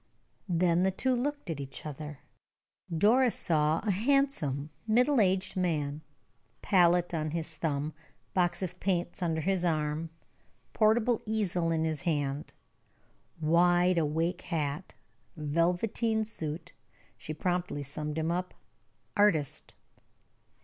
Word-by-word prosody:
Then 175 0 +3
the 190 - +3
two 255 +7 0
looked 285 - -2
at 155 - -4
each 135 +1 -7
other. 150 -1 -7 0.7
Doris 225 +9 +4
saw 155 -1 +2
a 210 - +1
handsome, 200 - +1 0.2
middle 250 +3 +4
aged 190 -1 +1
man, 155 -5 -1 0.6
palette 175 -3 +4
on 155 -1 -1
his 160 0 -4
thumb, 155 -1 -2 0.4
box 180 0 +1
of 180 0 -5
paints 180 -1 -1
under 165 -2 0
his 190 +1 0
arm, 155 -1 0 0.6
portable 225 +2 +3
easel 185 -6 0
in 160 -1 +1
his 160 -3 -1
hand; 145 -3 -1 0.9
wide 175 +2 +4
awake 165 +4 0
hat, 155 0 -3 0.4
velveteen 180 +9 +1
suit. 160 -7 -5 0.4
She - - -8
promptly 175 -2 -2
summed 150 +2 -5
him 160 +1 0
up 180 +1 -3 0.6
"artist." 180 -9 +1
170 Hz, 115 wpm, -30 LUFS, 155-190 Hz, 0.9 s, Doris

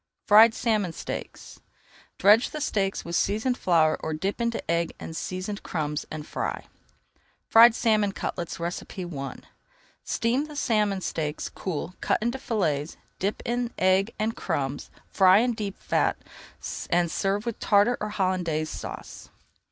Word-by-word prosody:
FRIED 220 +2 +7
SALMON 210 -7 0
STEAKS - - -7 0.6
Dredge 210 +6 +5
the 305 - -6
steaks 195 -9 -1
with 170 0 -3
seasoned 220 +8 +1
flour 165 -7 +3
or 160 - -3
dip 195 +8 -3
into 235 0 0
egg 170 0 0
and 160 - -7
seasoned 185 +4 -4
crumbs 150 -3 -3
and 155 -1 -6
fry. - - -4 0.8
FRIED 230 +1 +8
SALMON 215 -4 +2
CUTLETS 170 -4 -4
I 170 -4 -5 0.7
Steam 275 +6 -1
salmon 210 -8 +1
steaks, 155 -4 -3
cool, 180 0 -5
cut - - +2
into 240 +4 -2
fillets, 165 - -1 0.2
dip 200 +3 -2
in 240 0 -1
egg 190 +3 +3
and 220 +1 -1
crumbs, 140 -5 -3 0.2
fry 190 -1 +5
in 240 +2 +2
deep 205 -3 -5
fat, - - +1 0.7
and 170 -1 +2
serve 200 +2 -1
with 235 -2 -4
Tartar 205 +4 +4
or 210 - -2
Hollandaise 180 -6 -1
Sauce. - - -8
195 Hz, 135 wpm, -26 LUFS, 170-225 Hz, 0.8 s, FRIED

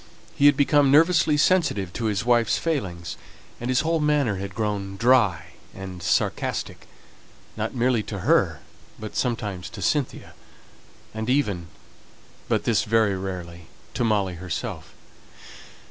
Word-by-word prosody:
He 145 - +4
had 145 -1 +5
become 145 0 +4
nervously 160 +1 +4
sensitive 145 - +2
to 115 - -3
his 105 0 -1
wife's 120 -2 +3
failings, 95 - -3 0.4
and 120 - -4
his 130 - +3
whole 165 +1 0
manner 145 -9 +1
had 95 0 -6
grown 100 -3 -3
dry 115 - +3 0.2
and 95 -2 -8
sarcastic, 80 - -1 0.7
not - - -3
merely 120 -1 +2
to 100 -3 -5
her, - - +2 0.4
but 110 -1 -8
sometimes 105 -7 -2
to - - -9
Cynthia, 145 -4 -1 0.8
and 110 +2 -4
even 105 -11 0 0.8
but - - +1
this - - +2
very 110 -3 +2
rarely, 90 -3 -6 0.3
to - - -1
Molly 100 -5 +1
herself. 90 0 -6
110 Hz, 130 wpm, -24 LUFS, 95-135 Hz, 0.8 s, had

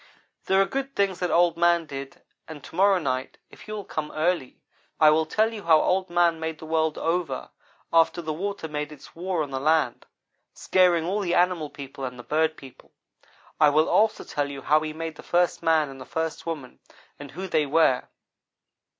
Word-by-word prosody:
"There 190 0 +3
are 195 - +5
good 270 +5 -4
things 195 -2 0
that 180 - -1
Old 170 0 +3
man 170 -1 +3
did 135 -2 -8 0.2
and 150 -4 -10
to - - -12
morrow 195 +1 +4
night, 130 -6 -3
if - - -15
you 215 - -5
will 205 -2 -6
come 150 -1 -4
early, 155 -4 -1 0.4
I 155 -1 +7
will 155 +1 +2
tell 220 +6 +1
you 215 - -6
how 160 -2 +6
Old 185 +2 +1
man 170 -1 +2
made 160 -1 -4
the 160 - -10
world 160 -1 0
over 165 -5 -2 0.4
after 165 +1 +4
the 160 -2 -3
water 195 +1 -4
made 150 0 -4
its 150 - -14
war 175 -1 -1
on 145 - -8
the 135 - -2
land, 150 -3 +1 0.5
scaring 175 -3 +3
all 195 +4 -1
the 180 -4 0
animal 175 -4 +2
people 135 -1 -9
and 125 -1 -5
the 120 - -9
bird 155 +4 0
people. 135 -2 -15 0.7
I 150 -1 +6
will 155 +2 +3
also 220 0 +2
tell 145 -1 -2
you 140 -1 -8
how 155 +1 +4
he 155 0 -4
made 160 0 -6
the - - -9
first 175 0 +1
man 160 -2 +3
and 135 -1 -10
the - - -8
first 160 +2 -4
woman 150 -6 -6 0.4
and 145 -1 -9
who 185 +7 -6
they 155 -4 +1
were. 145 -3 +3
160 Hz, 205 wpm, -25 LUFS, 150-175 Hz, 0.7 s, I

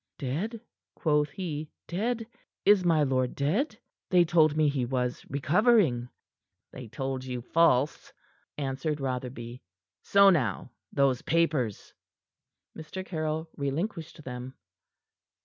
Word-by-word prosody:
"Dead?" 175 - -3 0.3
quoth 150 -2 +1
he. 155 -5 -5 0.2
"Dead? 225 +6 -1 0.4
Is 205 -2 +6
my 165 -4 +3
lord 130 -2 0
dead? 180 - 0 0.3
They 180 -2 +5
told 155 -2 +3
me 155 -1 +4
he 140 -3 0
was 125 0 -2
recovering." 150 - +3 0.6
"They 125 -2 -9
told 135 +2 -4
you 125 -1 -4
false," 150 -2 +2 0.5
answered 140 +2 -2
Rotherby. 125 -2 -4 0.4
"So 200 0 +6
now 125 - 0 0.2
those 135 -2 +2
papers!" 150 -10 0 0.8
Mr. 165 +4 -7
Caryll 155 -2 -2
relinquished 160 +3 -3
them. 125 0 -7
150 Hz, 110 wpm, -28 LUFS, 130-170 Hz, 0.8 s, Is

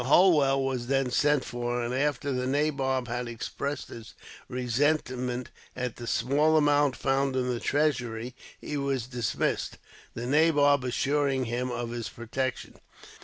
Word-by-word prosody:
Holwell 140 -3 +5
was 130 -3 -2
then 135 -1 +1
sent 145 +2 +2
for, 120 0 -2
and 120 +1 -2
after 140 +1 0
the 125 -1 -1
nabob 135 -3 0
had 120 +1 -3
expressed 140 +5 -4
his 115 -1 -10 0.3
resentment 125 -1 -1 0.2
at 125 -2 -4
the 120 - -7
small 145 +8 +2
amount 145 -2 +3
found 135 0 0
in 125 -1 0
the 120 -1 -1
treasury, 125 -6 0 0.3
he 150 - -4
was 135 -4 -1
dismissed, 125 -2 -2 0.4
the 120 - -4
nabob 145 -1 +4
assuring 135 +1 0
him 120 +2 -2
of 120 -1 -3
his 120 -1 -4
protection. 130 +2 -4
130 Hz, 140 wpm, -28 LUFS, 120-145 Hz, 0.4 s, Holwell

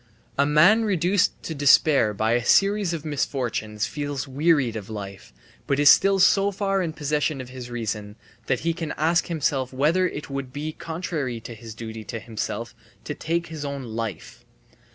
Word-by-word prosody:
A 140 +1 +2
man 175 +10 +5
reduced 190 -2 +1
to 160 - -4
despair 140 -4 +4
by 110 +2 0
a 120 0 +2
series 200 - +3
of 165 -2 -5
misfortunes 125 -7 -2
feels 145 -2 -4
wearied 140 -3 +2
of 105 -2 -6
life, 100 - -8 0.4
but 140 - +1
is 145 -1 +8
still 195 0 +4
so 195 +1 +4
far 195 -1 0
in 170 -3 -2
possession 150 -1 -1
of 130 -1 -7
his 125 -1 -8
reason 105 -3 -4 0.3
that - - 0
he 165 +1 0
can 165 -2 -4
ask 165 +3 +1
himself 140 -5 -1
whether 155 +8 +2
it 145 - -6
would 140 -1 -4
not 125 - -21
be 150 +2 -4
contrary 160 -8 -4
to 120 - -8
his 110 -1 -10
duty 110 -1 -7
to 115 - -5
himself 115 +2 -5 0.3
to 150 - -4
take 170 +3 -2
his 155 -2 -6
own 140 -1 -4
life. 115 -5 -6
145 Hz, 180 wpm, -24 LUFS, 115-165 Hz, 0.4 s, is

